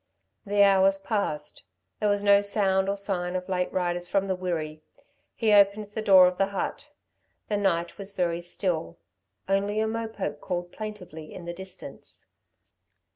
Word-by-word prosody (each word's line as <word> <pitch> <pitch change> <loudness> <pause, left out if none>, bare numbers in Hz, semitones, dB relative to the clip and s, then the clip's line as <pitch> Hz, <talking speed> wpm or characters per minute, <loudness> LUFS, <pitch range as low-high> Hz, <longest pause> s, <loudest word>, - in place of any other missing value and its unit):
The 205 0 +4
hours 195 0 +5
passed. 195 -7 -3 0.4
There 210 - +1
was 205 0 +1
no 200 0 +6
sound 195 -1 +1
or 200 - -1
sign 185 -3 -2
of 180 0 -3
late 180 -1 -1
riders 175 -1 -1
from 195 -1 +1
the 190 - 0
Wirree. 160 -4 -4 0.5
He 220 -2 +2
opened 205 +1 +4
the 220 - -4
door 190 -3 +7
of 180 0 0
the 195 - +3
hut. 200 +8 -4 0.6
The 210 - +1
night 175 -4 0
was 200 0 -4
very 175 -3 -1
still. 175 - -3 0.5
Only 200 +2 +1
a 220 - +2
mopoke 220 -9 -4
called 175 -1 -4
plaintively 180 -8 -8
in 180 - -9
the 170 - -4
distance. 190 +1 -10
195 Hz, 160 wpm, -27 LUFS, 175-205 Hz, 0.6 s, door